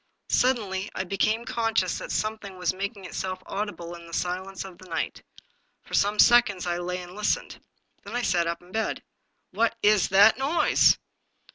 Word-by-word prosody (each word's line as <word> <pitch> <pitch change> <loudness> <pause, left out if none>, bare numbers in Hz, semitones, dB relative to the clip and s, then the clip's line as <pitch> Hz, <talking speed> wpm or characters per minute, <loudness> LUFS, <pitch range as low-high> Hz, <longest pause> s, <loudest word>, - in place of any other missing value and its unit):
Suddenly 210 -6 +1
I 185 - -1
became 215 +5 0
conscious 225 -6 0
that - - -6
something 215 -3 -3
was 180 0 0
making 200 +1 -5
itself 185 0 -4
audible 195 -4 -5
in 170 -1 -11
the 170 - -13
silence 185 +2 -3
of 185 -2 -11
the 185 - -14
night. 165 - -3 0.6
For - - -15
some 205 +1 +2
seconds 230 -6 +5
I 175 0 -1
lay 180 +1 -3
and 175 0 -11
listened. 210 +1 -2 0.4
Then 205 +4 -7
I 245 - -1
sat 175 -4 +1
up 170 +1 -3
in 180 - -18
bed. 220 +1 -2 0.5
"What 230 0 +1
w 210 0 +5
that 205 +6 +6
noise?" 285 +6 +4
195 Hz, 170 wpm, -26 LUFS, 180-215 Hz, 0.6 s, that